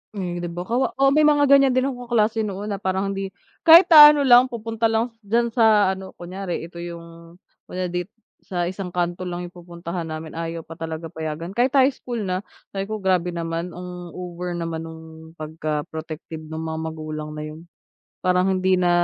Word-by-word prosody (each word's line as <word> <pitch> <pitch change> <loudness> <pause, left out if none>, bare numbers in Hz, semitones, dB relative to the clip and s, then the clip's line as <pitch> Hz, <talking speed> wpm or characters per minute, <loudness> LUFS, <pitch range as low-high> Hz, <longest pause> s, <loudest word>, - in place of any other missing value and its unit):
Hmm, 175 -3 -3
'di 175 - -4
ba 175 +1 -5
kawa 240 +7 -1
oo, 275 0 +4
may 300 +1 +5
mga 290 -1 +4
ganyan 275 -2 +6
din 255 - +3
akong 245 -1 -9
kaklase 225 -1 +2
noon 205 0 -3
na 200 - -3
parang 190 +1 -1
hindi 195 0 -3 0.4
kahit 340 +2 +9
naano 295 -2 +10
lang 250 0 +7
pupunta 225 -1 -2
lang 225 +2 0
diyan 230 +3 0
sa 215 -4 +4
ano, 190 0 -8
kunyari 180 0 -5
ito 170 +1 -10
yung 170 0 -10 0.3
kunyari 180 -1 -4
dito 180 +4 -4 0.3
sa 175 -2 -1
isang 185 +1 -4
kanto 175 +1 -1
lang 175 0 -4
yung 175 - -8
pupuntahan 170 -1 -7
namin 155 0 -6
ayaw 165 0 -5
pa 165 +1 -12
talaga 160 0 -5
payagan, 160 +2 -5
kahit 245 +5 +1
high 270 +1 +5
school 240 -4 -5
na, 185 -1 -1 0.3
sabi 195 0 -4
ko 215 -2 -4
"grabe 180 -2 +1
naman, 165 +1 -4
ang 180 -1 -8
over 180 -1 -5
naman 165 -1 -4
nung 160 0 -10 0.3
pagka 155 -1 -3
protective 160 0 -7
nung 160 +1 -5
mga 160 0 -4
magulang 155 -1 -6
na 150 - -5
'yun" 155 +2 -9 0.6
parang 180 +1 +3
hindi 185 0 +2
na 180 -1 +2
180 Hz, 190 wpm, -23 LUFS, 165-220 Hz, 0.6 s, naano